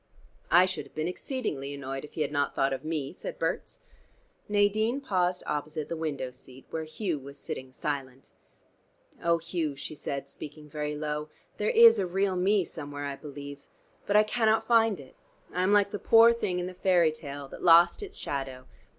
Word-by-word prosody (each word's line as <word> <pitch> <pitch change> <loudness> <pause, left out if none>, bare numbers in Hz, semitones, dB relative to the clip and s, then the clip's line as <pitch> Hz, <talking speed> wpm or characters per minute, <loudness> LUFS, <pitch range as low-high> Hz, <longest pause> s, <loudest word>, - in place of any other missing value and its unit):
"I 175 +2 +7
should 185 -2 -4
have - - -26
been 155 +1 -1
exceedingly 165 - -4
annoyed 135 -1 -5
if 150 - -11
He 155 - -2
had 145 - -3
not 145 -1 0
thought 135 0 +2
of 135 - -5
me," 155 -3 -3
said - - -7
Berts. - - -3 0.7
Nadine 210 +5 +2
paused 180 -8 0
opposite 150 0 -3
the 170 - -2
window 150 -5 -3
seat, 130 +1 -15
where 160 -1 -3
Hugh 165 -1 -3
was 140 +1 -11
sitting 130 0 -6
silent. 135 -1 -5 0.9
"Oh, 170 0 +3
Hugh," 165 -3 -3
she 140 - -7
said, 140 -2 -5
speaking 150 +2 -10
very 150 0 -3
low, 150 0 -3 0.3
"there 210 - 0
is 230 -1 +8
a 190 - 0
real 190 +1 0
me 190 +1 +2
somewhere, 145 -2 -6
I 140 -1 -3
believe. 145 -1 -9 0.4
But 205 - +1
I 210 - +8
cannot 220 0 +2
find 225 -5 +4
it. 135 -2 -13 0.4
I 180 - 0
am 185 +2 +2
like 205 -1 +4
the 205 - -4
poor 230 +1 +7
thing 190 -6 -2
in 180 - -2
the 185 - -6
fairy 180 -3 +3
tale, 145 -3 -7
that - - -10
lost 170 - +6
its 410 0 -7
shadow. 135 -2 -4
160 Hz, 190 wpm, -28 LUFS, 145-195 Hz, 0.9 s, is